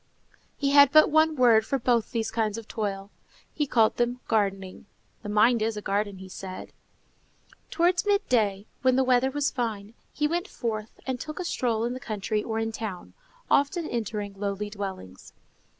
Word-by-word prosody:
He 280 -1 0
had 285 -1 +7
but 310 0 +6
one 315 0 +4
word 235 -4 +5
for 275 +5 -1
both 235 -3 +1
these 225 -3 -2
kinds 220 -2 -1
of 225 -1 -8
toil; 200 -2 -4 0.4
he 295 -2 -1
called 225 -4 +3
them 240 +1 0
gardening. 195 -3 -1 0.3
"The 205 - -7
mind 220 +3 +4
is 220 0 -1
a - - -4
garden," 200 -1 -2
said 185 0 -8
he. - - -31 1.0
Towards 350 +3 +1
midday, 220 - +1 0.2
when 255 -1 +3
the 265 - +3
weather 255 0 +3
was 285 +1 -1
fine, 220 -5 -4 0.2
he 300 - 0
went 345 +5 -2
forth 220 - -5
and 260 -2 -3
took 305 +5 -7
a 365 - -3
stroll 230 -8 -1
in 240 - -2
the 255 - -6
country 215 -2 -2
or 220 -1 -3
in 225 0 -1
town, 215 -5 -6 0.3
often 310 +4 +1
entering 210 -3 -3
lowly 200 +1 -4
dwellings. 190 - -7
225 Hz, 175 wpm, -26 LUFS, 205-265 Hz, 1.0 s, had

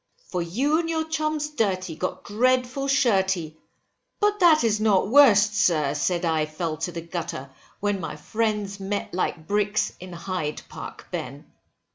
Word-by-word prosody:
For 180 - -2
you 260 - +1
and 330 -1 -2
your 320 -1 -1
chums 310 -1 -1
dirty, 185 - -1
got 185 +3 -4
dreadful 255 +4 +1
shirty, 190 - +1 0.6
but 415 0 +2
that 330 -6 +6
is 215 -2 +2
not 205 -3 +3
worst, 215 -6 +6
sir, 155 -8 +2
said 175 +4 0
I 160 -2 +1
fell 155 0 -3
to 165 +3 -3
the 170 0 -5
gutter, 165 -5 -5 0.3
when 205 -1 0
my 165 - -5
friends 210 +4 -2
met 200 +1 -3
like 175 -3 -2
bricks 205 +2 0
in 185 0 -9
Hyde 170 -3 -4
Park, - - -9
Ben. - - -5
200 Hz, 155 wpm, -25 LUFS, 170-250 Hz, 0.6 s, that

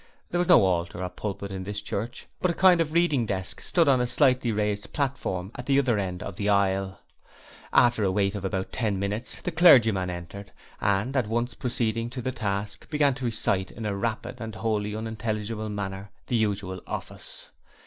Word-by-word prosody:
There 175 - 0
was 175 - +1
no - - +7
altar 85 0 -1
or 90 - -2
pulpit 100 0 -5
in 95 -1 -4
this 100 +2 -4
church, 105 +3 -4 0.2
but 185 - +2
a 170 - -1
kind 180 -2 +6
of 155 -2 -1
reading 155 -9 +2
desk 95 -2 -3
stood 170 -3 +2
on 130 -3 +4
a 125 - +1
slightly 125 -1 +3
raised 105 -1 -1
platform 110 -9 -2
at 125 - -8
the 135 -1 +4
other 125 -6 +2
end 90 -2 -3
of 95 - -7
the 105 -1 0
aisle. 95 -1 +1 0.7
After 120 -3 +4
a 95 - +2
wait 100 0 +1
of 100 -2 -5
about 95 -1 -2
ten 105 -5 -1
minutes, 100 +5 -2
the 180 - -2
clergyman 115 - +6
entered 90 +3 -7 0.3
and, 100 +7 +1
at 125 -5 +1
once 120 +2 -1
proceeding 115 -1 -1
to 125 +1 -5
the 130 - -1
desk, 105 -3 -3
began 150 -3 +3
to 130 0 -5
recite 100 -5 0
in 115 - -7
a 105 -1 -1
rapid 115 +4 -3
and 110 -1 -6
wholly 105 0 -1
unintelligible 110 -1 -3
manner 100 -1 -5 0.2
the 125 - -1
usual 100 -4 -1
office. - - -7
105 Hz, 195 wpm, -26 LUFS, 100-125 Hz, 0.7 s, no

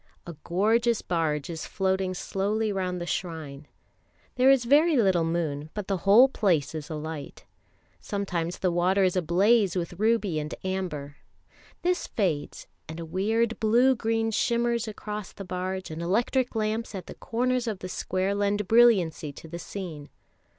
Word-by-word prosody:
A 170 - -7
gorgeous 225 +6 +2
barge 155 -5 -1
is 165 -2 -6
floating 190 -1 -1
slowly 210 +4 -1
round 185 -2 -2
the 175 - -4
shrine. 155 -6 -5 0.7
There 255 +1 +4
is 270 -3 +4
very 295 +5 +4
little 190 -7 +3
moon, 160 -3 -2
but 210 -3 -4
the 195 - 0
whole 230 +7 +8
place 180 - +1
is 155 0 -6
alight; 155 -2 -6 0.5
sometimes 180 - -3
the 185 - 0
water 180 +3 +2
is 185 -1 +2
ablaze 190 +3 +3
with 175 0 -4
ruby 215 -7 +1
and 150 +1 -5
amber; 175 -7 -4 0.7
this 360 +1 0
fades, 170 -9 -2 0.2
and 160 +1 -6
a 165 - -5
weird 220 +7 0
blue 240 +4 +4
green 225 -1 0
shimmers 235 +1 0
across 210 -1 -6
the 195 - -8
barge, 185 0 -4
and 160 +1 -5
electric 235 +8 0
lamps 220 0 -2
at 185 - -6
the - - -9
corners 250 +1 -1
of 215 -3 -2
the 185 - -7
square 185 +1 -1
lend 205 0 0
brilliancy 190 -10 +4
to 160 - -11
the 170 +2 -7
scene. 165 -6 -7
190 Hz, 155 wpm, -27 LUFS, 170-225 Hz, 0.7 s, whole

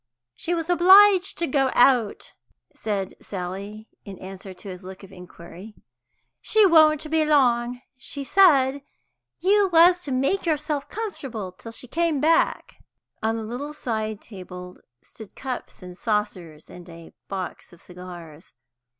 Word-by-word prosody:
"She 345 - -3
was 330 -1 -3
obliged 375 +2 +6
to 340 - 0
go 270 -2 +1
out," 245 -4 +2 0.4
said 200 -3 -4
Sally, 200 +3 -7 0.2
in 195 -3 -10
answer 190 +1 -10
to 185 +2 -11
his 185 -1 -8
look 190 +1 -11
of 195 - -13
inquiry. 180 +2 -13 0.7
"She 435 -1 +4
won't 310 -3 +5
be 320 -1 +3
long, 250 -6 +3
and 245 - -15 0.2
she 275 +2 -7
said 280 -6 +4 0.6
you 400 +1 +3
was 350 +2 +6
to 280 - -5
make 275 +9 0
yourself 300 -2 -2
comfortable 270 - -6
till 225 +5 -12
she 255 - -6
came 330 +1 0
back." 320 +4 +1 0.4
On 225 +1 -1
a 225 - -5
little 265 +7 -6
side 220 -5 -4
table 180 -3 -10 0.3
stood 220 -3 -13
cups 255 -7 -7
and 180 0 -10
saucers, 190 -7 -3
and 175 0 -13
a 165 0 -13
box 190 -2 -6
of 175 - -17
cigars. 175 -3 -12
235 Hz, 145 wpm, -24 LUFS, 190-310 Hz, 0.7 s, obliged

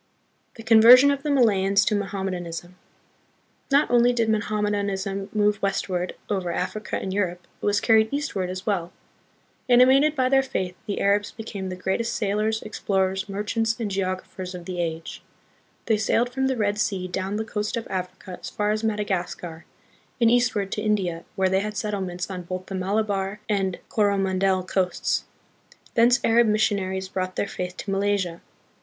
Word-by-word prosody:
The 225 - -10
Conversion 240 +5 +8
of 280 -1 -2
the 300 - -3
Malayans 200 -7 +3
to 215 - +1
Mohammed 195 -1 -2
anism. 175 0 -6 1.0
Not 280 0 +3
only 245 0 +5
did 230 -2 +1
Mohammedanism 205 -2 -1
move 210 -1 +1
west 195 0 -1
ward 180 0 -2
over 190 -4 -1
Africa 210 +5 -3
and 190 - -4
Europe, 180 -3 -2 0.2
it - - -4
was 205 0 +3
carried 220 -1 +4
eastward 245 -11 -2
as 185 +1 -6
well. 180 -5 -1 0.8
Animated 265 +5 +5
by 260 -2 +2
their 270 +1 +4
faith, 185 -9 -3
the 205 - -2
Arabs 205 +1 +2
became 205 -4 -6
the 185 - -4
greatest 190 +5 -2
sailors, 215 +1 0
explorers, 190 -1 -1
merchants, 220 +3 -1
and 215 -3 -2
geographers 185 -1 -3
of 175 -1 -8
the 180 -1 -3
age. 165 -1 -4 0.6
They 220 -2 +2
sailed 230 +3 +1
from 265 +1 0
the 260 -1 -1
Red 210 -1 0
Sea 195 -3 -1
down 190 +2 -3
the 220 +1 -2
coast 210 +1 -3
of 230 - -4
Africa 185 0 -6
as - - -6
far 210 0 -1
as 215 +1 -1
Madagascar, 185 -6 -3 0.5
and 230 -1 +5
eastward 225 -5 +1
to 210 - -2
India, 190 -6 -1
where 190 -1 +2
they 190 +1 +2
had 210 +1 -4
settlements 190 -4 -3
on 180 -1 -5
both 185 +1 -6
the 195 - -8
Malabar 195 +1 -1
and 195 -3 0
Coro 205 -2 +2
mandel 190 -1 +1
coasts. 185 0 -1 0.7
Thence 240 +2 +5
Arab 230 0 +4
missionaries 195 -3 0
brought 185 -1 -3
their - - -1
faith 180 -2 -5
to 200 - -5
Malaysia. 195 -3 0
200 Hz, 170 wpm, -24 LUFS, 185-220 Hz, 1.0 s, Conversion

